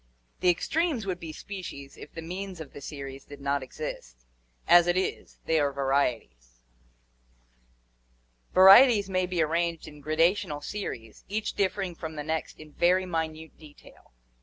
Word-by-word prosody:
3). - - 0
The - - +8
extremes 290 - 0
would 185 -2 -3
be 165 -3 -7
species 155 -6 -8
if - - -12
the 165 - -8
means 185 +1 -6
of 155 -4 -9
the 145 - -10
series 135 -2 -7
did 145 -1 -12
not 140 0 -1
exist; - - -8 0.4
as 175 0 +7
it 175 +1 +2
is, 190 - -3
they 160 -1 +2
are 145 -1 +1
varieties. 125 - -2 2.0
Vari 190 +5 +10
eties 220 -7 +2
may 185 -1 +1
be 180 -3 +1
arranged 165 +1 -1
in 150 -1 -12
gradational 155 0 +1
series, 115 - -6
each 215 +2 -2
differing 195 -2 -1
from 160 -1 -7
the 150 - -4
next 160 +1 -3
in 155 -1 -12
very 180 +2 +3
minute 160 -2 -4
detail. 150 -2 -17
160 Hz, 160 wpm, -27 LUFS, 140-185 Hz, 2.0 s, Vari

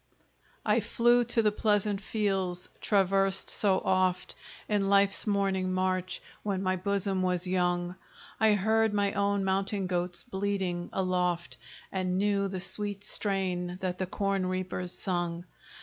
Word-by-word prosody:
I - - +4
flew 240 0 +3
to 230 -1 +1
the 210 - +4
pleasant 205 -1 +1
fields 195 -4 -1
traversed 195 -1 +2
so 195 -3 +2
oft 185 -1 +1 0.3
In 200 -2 +1
life's 200 +1 +3
morning 195 -2 +1
march, 185 0 -1 0.2
when 195 -2 -2
my 185 0 +1
bosom 195 0 0
was 180 -1 0
young; 175 -1 0 0.4
I 220 -1 +5
heard 220 +1 +2
my 200 -1 +1
own 200 0 +1
mountain 195 +1 0
goats 175 -1 -2
bleating 190 -5 -2
aloft, 180 -2 -1 0.3
And 185 -1 -1
knew 200 0 +2
the 190 -1 -4
sweet 205 +1 -3
strain 185 -4 -1
that 180 -1 -2
the 185 - -1
corn 195 0 0
reapers 185 -1 -3
sung. 175 -2 -2
190 Hz, 135 wpm, -29 LUFS, 185-200 Hz, 0.4 s, I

